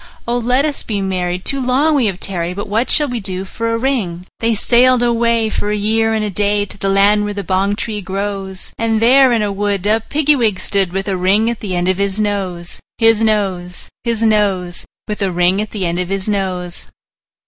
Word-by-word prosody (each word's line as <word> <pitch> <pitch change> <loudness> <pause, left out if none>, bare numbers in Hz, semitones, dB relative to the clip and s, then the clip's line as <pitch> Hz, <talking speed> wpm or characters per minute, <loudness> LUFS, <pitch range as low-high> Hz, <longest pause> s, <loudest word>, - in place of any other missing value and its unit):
Oh! 240 +1 0
let 250 +4 +1
us 295 -2 -2
be 210 -3 -3
married; 180 -2 -2
too 275 -1 +3
long 270 +5 +2
we 265 -6 +2
have 190 -2 -3
tarried: 180 -2 -3
But 205 - -5
what 220 +5 0
shall 295 - +5
we 245 -3 -3
do 190 -2 -4
for 230 +4 -3
a 230 - 0
ring?" 220 -9 -2
They 230 0 +1
sailed 245 +3 +3
away, 235 -2 +1
for 205 - -2
a 210 - 0
year 220 +2 +1
and 220 -1 0
a 210 - -3
day, 205 +1 +1
To - - -7
the 195 -1 -2
land 200 +2 +4
where 205 0 -3
the 200 - -3
bong 190 +3 0
tree 210 -1 -3
grows; 195 0 -5
And 225 -1 +1
there 260 +3 +5
in 230 -3 +2
a 205 - -1
wood 200 -1 -2
a 215 +2 +3
Piggy 295 +5 +1
wig 220 -7 0
stood, 195 -3 0
With 195 +2 -3
a 195 -2 -1
ring 200 +5 +2
at 235 - -6
the 190 -4 -4
end 175 0 0
of 185 0 +1
his 200 +1 -1
nose, 190 -5 -3 0.2
His 225 -1 +3
nose, 190 -5 -1
His 230 -1 -1
nose, 195 -5 0 0.2
With 210 -1 -4
a 195 -2 0
ring 180 +3 +2
at 215 - -4
the 200 -4 -3
end 170 +1 -1
of 180 0 -3
his 195 0 -3
nose. 185 -4 -3
205 Hz, 225 wpm, -17 LUFS, 190-230 Hz, 0.2 s, shall